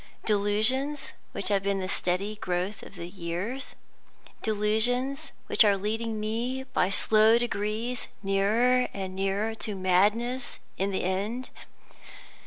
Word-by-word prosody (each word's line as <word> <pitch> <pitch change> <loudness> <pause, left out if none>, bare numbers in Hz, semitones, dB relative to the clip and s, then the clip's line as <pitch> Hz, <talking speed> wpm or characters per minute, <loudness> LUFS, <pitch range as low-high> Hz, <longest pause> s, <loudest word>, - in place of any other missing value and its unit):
Delusions 220 +8 +1 0.2
which 200 - -3
have 200 -1 +2
been 200 0 0
the 185 - -2
stealthy 190 +3 -1
growth 190 -1 -2
of 200 - -12
years? 180 +8 -4 0.7
delusions 240 +7 +1
which - - +5
are 205 -2 +4
leading 220 +2 -2
me, 235 +5 -2
by 260 -8 0
slow 215 +3 +5
degrees, 230 +1 -2 0.2
nearer 220 +6 +3
and 190 -1 -4
nearer 195 +3 0
to 215 -2 -4
madness 210 +7 +1 0.2
in 195 +1 0
the 190 - -1
end? 205 +7 -2
210 Hz, 120 wpm, -28 LUFS, 195-240 Hz, 0.7 s, which